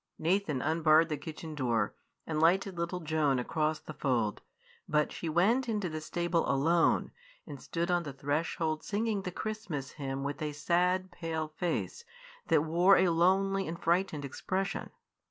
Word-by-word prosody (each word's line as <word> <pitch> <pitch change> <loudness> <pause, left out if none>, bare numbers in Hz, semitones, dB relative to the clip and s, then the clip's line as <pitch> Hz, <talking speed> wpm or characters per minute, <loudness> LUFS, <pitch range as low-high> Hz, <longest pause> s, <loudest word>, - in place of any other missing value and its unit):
Nathan 165 -5 0
unbarred 160 +1 +4
the 155 - 0
kitchen 155 +2 -7
door, 120 -7 0 0.3
and 155 -1 -2
lighted 190 +3 +3
little 170 +1 -3
Joan 155 -4 +1
across 155 +5 0
the 155 - -10
fold; 120 -8 0 0.5
but 150 0 +2
she 165 - -4
went 225 +10 +2
into 205 -5 -1
the 155 0 -5
stable 170 +1 -1
alone, 165 +5 +2 0.3
and 145 -4 -9
stood 170 +1 -2
on 175 0 +2
the 150 -4 -6
threshold 155 +3 -2
singing 210 0 -1
the 180 - -4
Christmas 185 -10 -4
hymn 135 -2 -4
with 145 +2 -4
a 150 -1 -2
sad, 180 +4 +1
pale 160 -3 -3
face 175 - -3 0.4
that 145 - +4
wore 175 +5 +5
a 185 - +4
lonely 190 +3 +2
and 170 +1 -5
frightened 170 -4 0
expression. 190 +8 -3
165 Hz, 155 wpm, -31 LUFS, 150-180 Hz, 0.5 s, wore